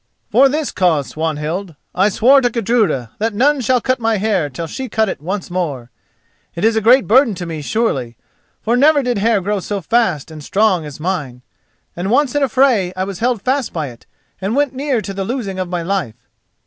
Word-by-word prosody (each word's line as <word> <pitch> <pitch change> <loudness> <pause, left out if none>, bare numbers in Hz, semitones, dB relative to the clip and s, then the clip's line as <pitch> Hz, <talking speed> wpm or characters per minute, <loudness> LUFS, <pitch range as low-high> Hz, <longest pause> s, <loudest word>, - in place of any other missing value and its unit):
"For 270 +1 +5
this 300 +1 -2
cause, 165 -7 +1
Swanhild: 160 +3 -3 0.2
I 190 +3 +3
swore 260 +7 +5
to 245 - +2
Gudruda 215 - 0
that 220 0 -1
none 280 +5 +3
should 250 0 +1
cut 255 -1 0
my 225 -1 +1
hair 195 -7 0
till 155 +5 -5
she 260 - -6
cut 220 -1 +1
it - - -5
once 185 +3 -4
more. 145 -10 -3 0.6
It 170 - -1
is 225 0 +3
a 220 - +1
great 250 +5 +5
burden 235 -1 +4
to 175 - -6
me 160 -2 -5
surely, 135 - -1 0.5
for 230 +2 +1
never 285 +2 +4
did 245 -4 -1
hair 220 -1 +2
grow 205 +2 -1
so 200 +2 -3
fast 195 - 0
and 155 -1 -9
strong 190 -3 +1
as 145 0 -10
mine, 150 -8 -3 0.5
and 180 +3 -3
once 265 +2 +2
in 290 - 0
a 275 - +2
fray 235 -8 +3
I 185 - 0
was 195 -2 -6
held 235 -3 0
fast 265 -1 -1
by 155 -5 -3
it 120 -1 -16 0.3
and 200 +5 -1
went 285 -2 +1
near 265 -3 -1
to 200 - -6
the 195 0 -3
losing 200 -4 -4
of 185 -1 -3
my 175 -1 -2
life. 170 - -2
200 Hz, 210 wpm, -17 LUFS, 170-245 Hz, 0.6 s, For